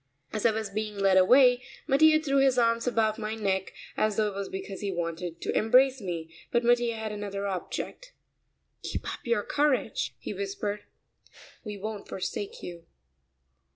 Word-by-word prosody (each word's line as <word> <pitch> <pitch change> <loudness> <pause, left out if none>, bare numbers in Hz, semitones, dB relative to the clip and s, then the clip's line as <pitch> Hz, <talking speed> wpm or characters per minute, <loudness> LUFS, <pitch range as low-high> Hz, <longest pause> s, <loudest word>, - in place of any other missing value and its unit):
As 215 +1 +2
I - - +4
was 220 -2 -3
being 210 0 -3
led 195 -1 +4
away, 245 +6 +6 0.2
Mattia 310 +2 +5
threw 275 -3 0
his 270 -2 +4
arms 230 0 +2
about 225 -2 +1
my 215 0 -3
neck, 190 -3 -1 0.2
as 215 -1 +1
though 215 0 +2
it - - -8
was 195 0 -4
because 195 0 -6
he 200 -1 -2
wanted 170 -1 -4
to - - -2
embrace 255 +3 +4
me, 165 -4 -5 0.2
but 240 0 +2
Mattia 240 -1 +3
had 220 -1 -4
another 200 -1 -4
object. 200 - -5 0.7
"Keep - - -4
up - - -8
your 235 -3 +2
courage," 290 -2 0
he - - -6
whispered, 300 - -4 0.8
"we 210 -2 -6
won't 210 +1 -6
forsake 195 +1 -5
you." 170 -1 -8
215 Hz, 165 wpm, -28 LUFS, 195-245 Hz, 0.8 s, away